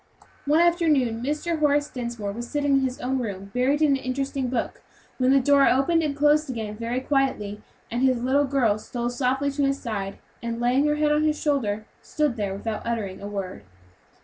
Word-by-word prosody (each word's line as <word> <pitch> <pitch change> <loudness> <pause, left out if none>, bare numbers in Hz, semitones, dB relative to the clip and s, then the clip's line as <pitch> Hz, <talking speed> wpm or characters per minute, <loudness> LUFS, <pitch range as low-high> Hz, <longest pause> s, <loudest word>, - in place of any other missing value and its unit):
One 300 +3 +4
afternoon 305 -10 +2
Mr. 300 +5 -2
Horace 290 -1 +2
Dinsmore 235 -6 -5
was 235 +3 -6
sitting 285 -1 0
in 275 - +5
his 260 -1 -2
own 260 +1 -1
room, 200 -4 -5
buried 275 +5 +2
in 305 - +4
an 275 - +3
interesting 270 0 -2
book, 245 -1 -3 0.4
when 255 0 +3
the 275 +1 +6
door 280 +1 +4
opened 275 +6 +3
and 295 -3 -1
closed 295 0 +3
again 220 -4 -4
very 230 +3 -2
quietly, 260 -7 -1 0.3
and 240 +2 -1
his 255 -2 +2
little 275 +3 +3
girl 250 -6 +1
stole 240 +2 -4
softly 265 +3 0
to 280 +1 -2
his 275 0 +1
side, 200 -5 -4 0.2
and 235 0 -4
laying 250 +4 +2
her 295 - +2
head 300 0 +2
on 300 0 +3
his 305 0 +1
shoulder, 220 -9 0 0.2
stood 300 -5 -1
there 200 -3 -2
without 215 +2 -4
uttering 215 -6 -3
a 200 - -5
word. 195 -2 -5
260 Hz, 200 wpm, -25 LUFS, 230-285 Hz, 0.4 s, the